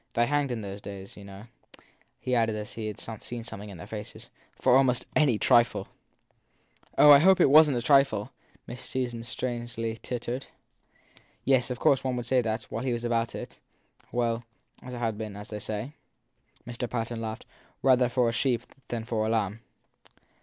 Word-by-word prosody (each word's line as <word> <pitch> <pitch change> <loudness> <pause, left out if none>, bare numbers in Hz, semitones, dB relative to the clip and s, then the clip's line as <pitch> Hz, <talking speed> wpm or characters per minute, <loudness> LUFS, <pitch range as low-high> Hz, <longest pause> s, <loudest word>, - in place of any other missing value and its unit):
They 120 - +3
hanged, 145 +1 +1
in 120 -3 -3
those 100 0 -7
days, 100 -1 -9
you 100 - -11
know, 100 +1 -10 0.8
he 125 - -2
added 115 -2 +2
as 105 0 -5
if - - -11
he 110 -1 -4
had 105 - -6 0.2
seen 120 -1 -6
something 105 -2 -8
in 100 - -9
their 85 - -9
faces, 105 0 -8 0.2
for - - +3
almost 125 -2 +3
any 140 -8 +4
trifle! 120 +2 +3 1.1
Oh, 150 - +9
I 140 - +10
hope 190 +4 +5
it - - +5
wasn 150 -2 +7
t - - +1
for - - -6
a - - -11
trifle! 135 -7 +3 0.3
Miss 125 - -8
Susan 120 -3 -3
strangely 120 -2 -4
tittered. 125 +1 -4 1.0
Yes, 130 -1 +3
of 125 - -3
course 135 +2 +3
one 130 -1 -1
would 120 0 -4
like 130 -2 +4
that, 110 0 -1
while 115 +3 -5
he 130 -2 0
was 120 0 -3
about 115 -1 0
it - - -8 0.5
well, 120 -1 0 0.4
it 125 - -10
had 115 -3 -2
been, 105 -2 -5
as 105 - -9
they 105 - -5
say/ 110 +6 -4 0.7
Mr. 120 0 -4
Patten 115 -1 -3
laughed, 110 -1 -5 0.4
rather 125 -2 +5
for 125 -1 +2
a - - +2
sheep 120 -1 0 0.2
than 115 -2 -3
for 115 -2 -1
a 110 - 0
lamb! 110 -1 -1
120 Hz, 190 wpm, -28 LUFS, 110-125 Hz, 1.1 s, I